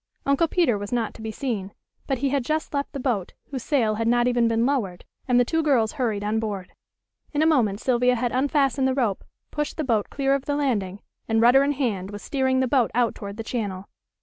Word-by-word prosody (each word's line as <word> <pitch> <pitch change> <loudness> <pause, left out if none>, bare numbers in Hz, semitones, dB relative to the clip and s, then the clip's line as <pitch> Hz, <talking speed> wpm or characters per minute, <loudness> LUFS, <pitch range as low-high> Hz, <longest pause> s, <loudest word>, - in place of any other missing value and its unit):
Uncle 280 +4 +3
Peter 310 - +2
was 205 0 -6
not 235 -3 -1
to - - -12
be 220 - -4
seen. 215 -5 -4 0.3
But 270 - 0
he 275 +2 0
had 275 -1 0
just 310 +5 -2
left 280 -1 -2
the 280 - -5
boat, 235 -8 -1 0.2
whose 265 -3 -4
sail 230 -5 +1
had 225 - 0
not 240 +1 +3
even 240 -1 +2
been 230 0 +2
lowered, 220 -10 -1 0.2
and 250 -1 +4
the 245 - +4
two 325 +5 0
girls 255 -8 +2
hurried 225 -7 -2
on 215 +2 0
board. 205 -4 -4 0.6
In 295 +1 +2
a - - +3
moment 235 -11 +2
Sylvia 250 0 +2
had 240 0 -1
unfastened 275 0 +1
the 260 - 0
rope, 230 -8 0 0.3
pushed 295 0 -3
the 310 - -1
boat 225 -6 0
clear 275 -1 0
of 275 -1 -1
the 290 - -1
landing, 205 -9 -1 0.2
and 225 0 +2
rudder 245 +4 +6
in 285 +1 +1
hand 215 -9 -2
was 205 0 -8
steering 260 -2 +1
the 260 - +1
boat 250 -2 +2
out 240 -2 +2
toward 200 0 -8
the 225 - -4
channel. 200 -5 -4
245 Hz, 230 wpm, -24 LUFS, 220-275 Hz, 0.6 s, rudder